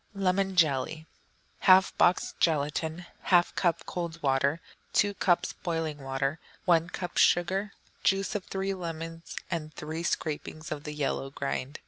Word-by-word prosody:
Lemon 195 0 +1
Jelly 155 -1 +2 0.6
1/2 190 0 +6
box 180 - +3
gelatine. 160 +2 0 0.2
1/2 175 -2 +4
cup 170 -3 0
cold 170 -2 -4
water. 140 +3 +2 0.3
2 205 0 +3
cups 180 -2 +1
boiling 165 -4 -3
water. 135 +3 -2 0.3
1 170 -1 +4
cup 180 0 -5
sugar. 190 +4 +3 0.3
Juice 195 +1 +2
of 205 -3 -2
three 195 0 -2
lemons, 165 -2 -6 0.2
and 155 -3 -3
three 155 +2 -5
scrapings 155 -1 -3
of 150 0 -4
the 150 - -4
yellow 135 -2 -2
rind. 140 +1 -2
165 Hz, 135 wpm, -29 LUFS, 150-185 Hz, 0.6 s, 1/2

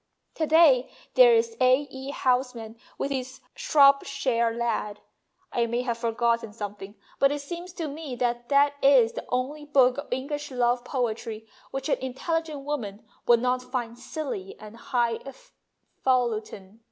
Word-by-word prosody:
To 315 - -1
day 300 -6 +5 0.2
there's 465 -2 +5
A. 255 +3 +4
E. 265 +1 -7
Housman 250 -5 -1 0.2
with 280 - -2
his 260 -1 -4
' - - -48
Shropshire 275 - +4
Lad.' 225 -3 -2 0.5
I 235 -1 0
may 240 +2 -1
have 235 -2 -2
forgotten 230 -1 0
something, 205 -1 -7 0.2
but 275 0 +4
it 290 0 -3
seems 345 +5 -7
to 330 -3 -4
me 290 -2 -6
that 240 -1 -2
that 285 0 +4
is 260 -5 +5
the - - -7
only 265 +4 -2
book 270 -3 +3
of 285 - -7
English 290 +3 -3
love 245 -1 +1
poetry 225 -3 -3 0.2
which 270 - -4
an - - +1
intelligent 300 +3 -3
woman 225 -9 -4 0.2
would 235 -1 +5
not 250 0 +1
find 250 -2 -4
silly 245 - -6
and 215 +1 -11
high 235 -1 -1 0.8
falutin. 220 -5 -1
255 Hz, 150 wpm, -26 LUFS, 235-280 Hz, 0.8 s, day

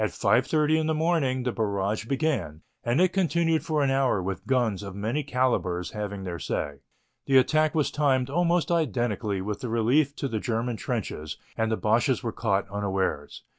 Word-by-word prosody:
30 150 +9 +2
in 155 - -1
the 160 - +1
morning 155 -6 +1
the 125 - 0
barrage 105 -1 -1
began 120 - -1 0.2
and 120 +5 +1
it 185 0 +3
continued 170 -3 +1
for 155 -2 0
an 135 - +2
hour 135 -6 +2
with 95 +1 -4
guns 120 -7 +1
of 100 -2 -7
many 115 +9 -1
calibres 120 -10 0
having 100 -2 -5
their 90 -2 -5
say. 75 -1 -3 0.5
The 135 - +5
attack 155 +4 +3
was 150 -3 +1
timed 135 -4 +2
almost 170 +1 +1
identically 120 - 0
with 105 +2 -4
the 125 -3 -4
relief 130 +6 +2
in 135 - -1
the 110 - -1
German 115 +1 -2
trenches 105 - -4 0.2
and 110 0 0
the 110 - +1
Boches 120 +5 +1
were 115 - -2
caught 100 -4 0
unawares. 95 -7 -2
120 Hz, 175 wpm, -26 LUFS, 100-150 Hz, 0.5 s, The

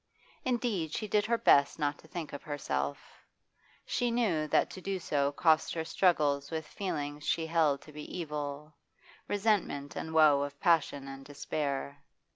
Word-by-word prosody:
Indeed 230 -11 -1
she 215 - -3
did 210 +1 +2
her 235 0 +2
best 140 -9 +4
not 145 -2 -1
to - - -17
think 160 -3 -6
of 145 - -6
herself; 70 - -4 0.6
she 245 - 0
knew 205 -11 +1
that - - +2
to 185 - -8
do 195 +1 -2
so 145 -5 0
cost 160 +3 +3
her 160 -1 -2
struggles 150 -5 +2
with 160 -1 -3
feelings 150 -5 -4
she 165 +1 0
held 160 -4 +2
to 155 - -13
be 150 +4 -7
evil, 150 -2 -5 0.5
resentment 200 -9 0
and 160 - -4
woe 155 -3 +6
of 145 0 -4
passion 145 -5 +2
and 135 0 -8
despair. 140 -1 -3
155 Hz, 160 wpm, -31 LUFS, 145-175 Hz, 0.6 s, woe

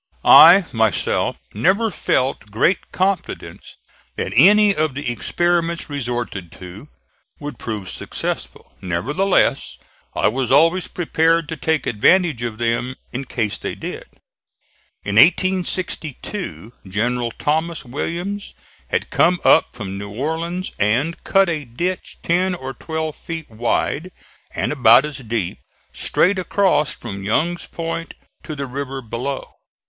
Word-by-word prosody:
I, 175 +4 +9
myself, 110 -2 +1 0.2
never 195 - +2
felt 130 - -1
great 115 - +1
confidence 190 -1 -3 0.4
that 95 - -3
any 205 - +6
of 155 -3 0
the 140 -3 -2
experiments 170 +5 -1
resorted 120 -9 -4
to 95 +10 -11 0.5
would 145 0 -7
prove 105 -5 -5
successful. - - -5
Nevertheless 135 - +1 0.4
I - - +2
was 125 +2 -1
always 165 +6 +4
prepared 165 -1 +1
to 160 - -3
take 160 0 -1
advantage 155 - +3
of 115 -2 -4
them 120 +2 -1 0.2
in 130 +2 -4
case 110 -5 -2
they - - -4
did. - - -7 1.0
In 100 0 -2
1862 180 - 0
General 120 +5 -1
Thomas 160 +6 -2
Williams 175 +10 -4 0.3
had - - -2
come 180 0 +3
up - - +6
from 100 -4 -6
New 100 0 -6
Orleans 160 - -3
and 120 +11 0
cut 195 0 +3
a 160 -3 -2
ditch 175 +10 -4
ten 180 +2 +1
or 135 -5 -6
twelve 160 +2 -4
feet 165 -5 -7
wide 120 +9 -1 0.4
and - - -1
about 125 -2 +6
as 150 -2 -6
deep, 115 -7 -3 0.3
straight 185 +2 +1
across 180 -5 +2
from 105 -9 -7
Young's 160 - -1
Point 165 0 -5 0.3
to 155 - -7
the 140 -1 -4
river 135 0 -5
below. 125 +4 -5
145 Hz, 125 wpm, -20 LUFS, 120-170 Hz, 1.0 s, I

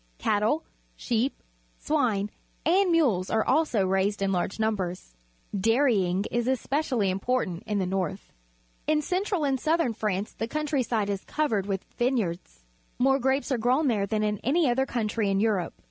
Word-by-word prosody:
Cattle, 215 - +1 0.3
sheep, 240 +3 -1 0.3
swine, 225 -9 0 0.3
and 370 +3 +4
mules 240 - +2
are 220 0 +1
also 260 -8 +2
raised 195 +2 +1
in 195 - +1
large 185 +3 -1
numbers. 185 - -2 0.4
I)airyiag;_is_especially 230 - +1
important 195 -2 -1
in 210 - 0
the 190 - 0
north. 190 +1 -3 0.5
In 305 0 +2
central 370 -1 0
and 270 -2 +1
southern 315 -4 +1
France 210 -2 -2
the 225 - -4
coimtrj'side 255 -7 -1
is 200 -1 -2
covered 225 -11 0
with 195 -2 -2
^'ineyards. 185 - -1 0.3
More 270 +2 +3
grapes 265 +2 0
are 255 - +1
grown 260 +6 +2
there 205 -4 +1
than 215 +1 0
in 210 -1 0
any 305 +5 +2
other 265 +2 +1
count 220 -4 -1
rj^ 215 -3 0
in 195 0 +1
Europe. 205 -5 0
225 Hz, 150 wpm, -27 LUFS, 195-270 Hz, 0.5 s, and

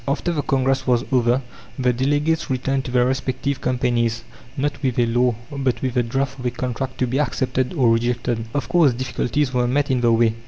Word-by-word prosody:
After 155 +5 0
the 150 - 0
congress 135 -1 0
was 120 -2 +2
over, 125 0 +2 0.3
the 125 -2 +2
delegates 145 +6 0
returned 135 0 -1
to 125 - -5
their 125 -1 +3
respective 130 +1 -2
companies, 120 -2 0 0.3
not 145 +1 -2
with 130 -4 -1
a 120 - +4
law, 120 +1 +2 0.2
but 135 -3 -1
with 130 -2 -1
the 125 - +2
draft 135 +3 -2
of 125 - -7
a - - +2
contract 125 +1 -4
to 130 - +1
be 130 +3 -1
accepted 130 -3 0
or 125 -6 +4
rejected. 120 0 -1
Of 140 -5 -1
course 160 -5 +4
difficulties 130 +2 -1
were 125 -1 +2
met 140 +2 +1
in 125 -2 +1
the 120 -1 +4
way. 115 -1 +3
130 Hz, 205 wpm, -21 LUFS, 120-135 Hz, 0.3 s, a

